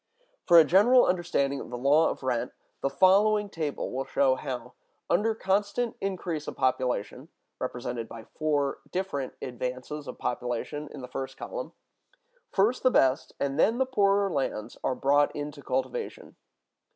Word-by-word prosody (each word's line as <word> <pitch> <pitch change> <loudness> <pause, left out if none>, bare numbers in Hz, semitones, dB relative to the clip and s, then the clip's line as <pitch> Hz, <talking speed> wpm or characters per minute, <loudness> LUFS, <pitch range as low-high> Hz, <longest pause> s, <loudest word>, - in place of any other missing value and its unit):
For 170 - +8
a 165 - +10
general 210 - +5
understanding 170 -6 0
of - - -8
the 120 - -5
law 145 +6 +4
of - - -6
rent 125 -1 -1 0.3
the 135 - +1
following 205 +6 +4
table 155 -3 -3
will 130 +1 -2
show 135 -2 +3
how, 130 -2 -5 0.4
under 220 +5 +2
constant 205 +4 0
increase 180 -5 -3
of - - -5
population 130 +2 -1 0.3
(represented 125 -2 -4
by 115 -1 -9
four 145 0 -1
different 180 -8 -3
advances 130 +3 -5
of 125 - -7
population, 125 +5 -3
in 145 - -8
the 125 - -7
first 135 +1 -6
column), - - -6 0.8
first 215 +6 +2
the 255 - +5
best 135 - +2
and 140 +1 -1
then 225 +7 +4
the 265 - +2
poorer 200 -5 +2
lands 130 -7 -2
are 130 - 0
brought 145 +2 +2
into 145 0 -5
cultivation. 445 - -3
145 Hz, 150 wpm, -28 LUFS, 130-195 Hz, 0.8 s, a